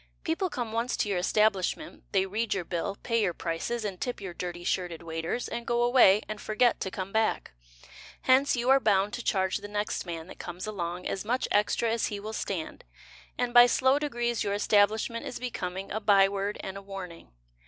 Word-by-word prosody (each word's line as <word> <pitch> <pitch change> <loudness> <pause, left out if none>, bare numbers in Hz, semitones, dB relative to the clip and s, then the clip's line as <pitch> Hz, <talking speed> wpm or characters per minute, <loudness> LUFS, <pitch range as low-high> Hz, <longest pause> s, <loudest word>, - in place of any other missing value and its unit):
People 340 +3 -1
come 240 -7 -4
once 230 +2 -1
to 210 - 0
your 190 -3 +1
establishment, 195 0 0
They 190 -1 +2
read 215 +3 -1
your 190 - -2
bill, 185 +4 -3
Pay 230 -2 +1
your 180 -5 0
prices 200 +7 -3
And 190 -3 -5
tip 245 - -3
your 190 -3 -6
dirty 175 0 -5
shirted 175 -2 -2
waiters, 165 +8 -3
And 235 0 -4
go 240 0 +1
away 240 -5 +6
And 215 -1 -6
forget 230 +3 +2
to 190 - -2
come 185 +2 -5
back. 220 - 0 0.7
Hence 265 +2 +4
You 245 +2 +2
are 270 - +7
bound 205 -3 +2
to 245 -1 -4
charge 190 -1 +1
The - - -8
next 205 -2 -3
man 165 -2 -5
that - - -12
comes 175 +1 -6
along 180 -4 -4
As 195 - -2
much 245 +4 0
extra 210 +2 +2
as 230 0 0
he 205 - -4
will 215 +2 -6
stand, 185 -6 -4 0.5
And 245 -1 -1
by 245 0 +9
slow 260 +3 +3
degrees 240 -5 -1
Your 200 0 -1
establishment 215 +3 +2
Is - - -5
becoming 195 -6 -5
A 220 - -1
by 200 -2 +5
word 200 +1 -3
And 190 0 -6
a - - -8
warning. 195 -4 -8
205 Hz, 205 wpm, -28 LUFS, 190-235 Hz, 0.7 s, by